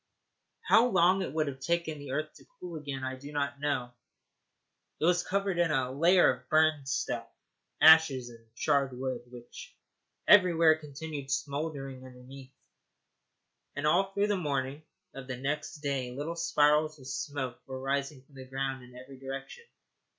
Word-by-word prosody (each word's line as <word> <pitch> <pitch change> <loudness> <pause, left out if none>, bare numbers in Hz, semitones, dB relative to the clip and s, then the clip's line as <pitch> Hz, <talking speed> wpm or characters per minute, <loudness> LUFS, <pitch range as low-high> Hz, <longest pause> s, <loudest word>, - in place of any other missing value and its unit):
How 230 +2 +5
long 185 -2 +3
it 185 - -3
would 155 +1 0
have 135 -2 -6
taken 160 +1 -2
the 145 -1 -9
earth 155 +3 -3
to - - -18
cool 175 -2 -7
again 140 -3 -6
I 130 0 -3
do 140 +3 -10
not 140 -1 -2
know. 140 -4 -2 1.1
It - - 0
was 175 +1 +3
covered 195 0 -1
with 175 -1 +2
a 130 -4 0
layer 170 +4 +4
of 125 0 -25
burned 155 -3 +2
stuff, - - -2 0.5
ashes, 155 -5 +6
and 115 -1 -15
charred 140 -2 +1
wood, 130 -1 -3
which 120 -1 -12 0.5
everywhere 170 -5 +6
continued 150 -1 -7
smouldering 135 -1 -3
underneath, 130 +1 -13 1.2
and 145 +1 -3
all 190 +5 +3
through 200 +1 +1
the 205 - +1
morning 140 -3 -2 0.3
of 135 -1 -9
the 130 -1 -5
next 150 +3 -4
day 135 -4 -2
little 145 +7 -5
spirals 155 -2 +2
of 130 - -15
smoke 130 -1 -4
were 130 -1 -6
rising 140 0 -2
from 140 - -27
the 130 -1 -10
ground 135 0 -4
in 125 0 -15
every 130 +1 -12
direction. 135 - -8
140 Hz, 160 wpm, -30 LUFS, 130-160 Hz, 1.2 s, ashes